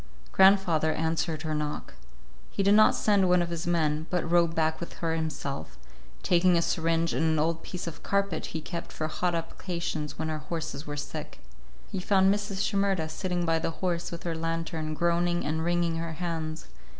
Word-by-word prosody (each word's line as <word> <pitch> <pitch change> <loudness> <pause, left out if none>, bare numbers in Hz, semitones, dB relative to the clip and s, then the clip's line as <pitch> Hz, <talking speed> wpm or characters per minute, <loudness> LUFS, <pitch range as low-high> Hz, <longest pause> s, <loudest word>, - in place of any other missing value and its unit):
Grandfather 190 -5 +5
answered 160 0 -1
her 155 -1 -2
knock. 150 -1 -3 0.6
He 195 - -1
did 200 +1 +5
not 215 +1 +6
send 200 -3 +3
one 180 -1 +5
of 170 - -4
his 170 0 -3
men, 160 -2 +1
but 180 -2 0
rode 170 -1 +3
back 160 0 +1
with 170 - -6
her 165 -1 -2
himself, 140 - -4 0.5
taking 175 0 +4
a - - +3
syringe 165 0 +1
and 130 - 0
an 160 -1 +2
old 165 +2 +1
piece 180 +1 -6
of 165 -2 -7
carpet 200 -4 0
he 160 - -4
kept 170 +2 -6
for 155 - -3
hot 175 +2 -1
applications 165 -3 -4
when 160 0 -2
our 155 - -3
horses 160 -1 -5
were 145 0 -4
sick. 150 +1 -6 0.5
He 190 - -2
found 190 +1 +4
Mrs. 205 -1 -2
Shimerda 195 -5 +1
sitting 175 +1 -2
by 165 -1 +2
the 160 - -1
horse 175 0 -2
with 170 - -6
her 170 - -2
lantern, 165 -1 -3
groaning 175 +1 +1
and 160 +1 -1
wringing 170 -1 +1
her 165 0 -3
hands. 160 -2 -4
165 Hz, 185 wpm, -28 LUFS, 160-175 Hz, 0.6 s, not